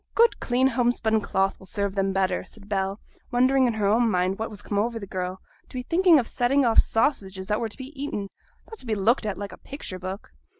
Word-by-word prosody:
'A - - -44
good 465 +1 +4
clean 250 +1 +1
homespun 235 -3 +2
cloth 195 -1 0
will 190 - -13
serve 200 0 -2
them 195 -1 0
better,' 190 -1 0
said 205 -2 -15
Bell, 195 0 -1 0.3
wondering 255 +1 +3
in 235 - 0
her 210 -2 0
own 225 +3 +3
mind 185 0 0
what 220 - -2
was 205 -2 -11
come 205 - -1
over 230 +2 0
the 210 - -6
girl, 185 -1 -4 0.3
to - - -13
be 250 - -3
thinking 345 +3 +5
of 245 -5 +1
setting 265 +3 +2
off 230 -2 +5
sausages 195 -6 +1
that 210 +2 0
were 225 - -1
to - - -8
be 265 +2 -9
eaten, 270 -8 -4 0.4
not 445 - -10
to 255 - -9
be 220 - 0
looked 215 +3 +2
at 200 - -3
like 200 0 -5
a - - -11
picture 235 -9 -7
book. 185 +2 -7
220 Hz, 245 wpm, -25 LUFS, 195-250 Hz, 0.4 s, thinking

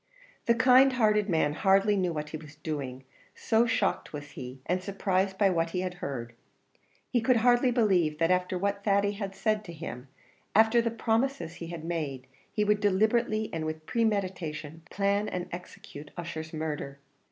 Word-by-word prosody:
The 235 - +5
kind 255 +2 +6
hearted 210 -4 +2
man 160 -4 +2
hardly 195 +4 +3
knew 185 -3 +1
what 150 -2 -4
he 155 - -5
was 150 -1 -13
doing, 140 -4 -5 0.3
so 225 +1 +2
shocked 230 +1 0
was 150 -1 -8
he, 130 +1 -8
and 180 +2 0
surprised 190 0 -1
by 195 -2 +4
what 165 -1 0
he 180 +2 -2
had 185 -1 -3
heard. 120 -4 -4 0.8
He 240 - +2
could 250 +3 +3
hardly 245 +2 +4
believe 190 -10 +2
that 165 +2 +2
after 180 0 +1
what 200 +2 -1
Thady 200 0 +2
had 200 -2 -5
said 215 +2 0
to 170 - -8
him, 145 -6 -7 0.5
after 220 +2 +5
the 230 - 0
promises 230 -2 -1
he 170 - -4
had 165 -2 -7
made, 150 -6 -3 0.3
he 210 - 0
would 210 0 +2
deliberately, 215 +2 +1
and 165 -1 -2
with 155 0 -5
premeditation, 185 - -2
plan 200 +1 0
and 180 -1 -4
execute 155 -4 -9
Ussher's 160 -2 -5
murder. 150 -3 -4
185 Hz, 175 wpm, -29 LUFS, 160-215 Hz, 0.8 s, kind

